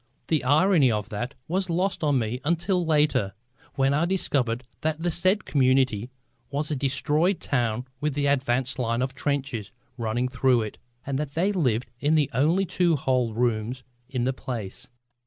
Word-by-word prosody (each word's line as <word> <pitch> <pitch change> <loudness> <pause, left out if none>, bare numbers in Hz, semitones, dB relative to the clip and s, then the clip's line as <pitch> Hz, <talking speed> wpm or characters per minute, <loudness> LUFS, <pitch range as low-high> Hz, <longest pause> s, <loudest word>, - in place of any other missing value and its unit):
The 155 -5 +2
irony 150 0 +4
of 105 -1 -2
that 120 +5 -4
was 185 +2 -1
lost 180 +2 0
on 145 -3 +3
me 120 +1 -2
until 175 +4 +1
later, 150 - +2 0.4
when 135 0 +2
I 150 +4 +2
discovered 130 -10 0 0.2
that 155 +1 -1
the 175 - +1
said 185 +5 +2
community 130 -4 +2 0.4
was 145 +2 -2
a - - +1
destroyed 145 +7 +1
town 120 -2 -1
with 150 -1 -1
the 145 -1 0
advance 130 -1 +1
line 115 0 0
of 130 +1 -3
trenches 135 -8 -2 0.3
running 120 +2 0
through 125 -2 +2
it, 105 - -7 0.3
and 135 0 -2
that 150 -2 -4
they 185 +5 +2
lived 125 - 0
in 150 +4 +2
the 150 -3 +2
only 160 +10 +2
two 175 -2 +2
whole 125 -5 0
rooms 120 +1 -1 0.3
in 130 -3 -1
the 130 +2 +1
place. 120 -1 -6
135 Hz, 170 wpm, -26 LUFS, 125-155 Hz, 0.4 s, irony